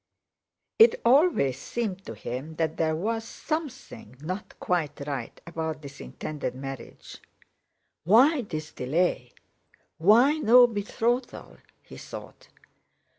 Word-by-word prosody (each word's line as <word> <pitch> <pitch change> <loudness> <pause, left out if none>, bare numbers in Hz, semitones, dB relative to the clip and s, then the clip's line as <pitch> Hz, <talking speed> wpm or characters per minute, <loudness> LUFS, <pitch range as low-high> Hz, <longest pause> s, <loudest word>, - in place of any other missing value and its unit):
It 475 +2 +7
always 240 - +4
seemed 195 -5 -4
to 115 - -6
him 130 +8 -6
that 160 -1 -1
there 160 -1 +1
was 225 +7 -2
something 260 - -6
not 185 +6 -6
quite 170 -5 -1
right 140 -2 -5
about 160 -2 -4
this 140 -1 -10
intended 150 -4 -5
marriage. 135 0 -9 0.8
"Why 255 - +5
this 155 -8 -6
delay? 130 -2 -1 0.7
Why 240 - +5
no 245 -1 +7
betrothal?" 235 +3 -2 0.3
he - - -12
thought. - - -10
185 Hz, 110 wpm, -27 LUFS, 150-240 Hz, 0.8 s, It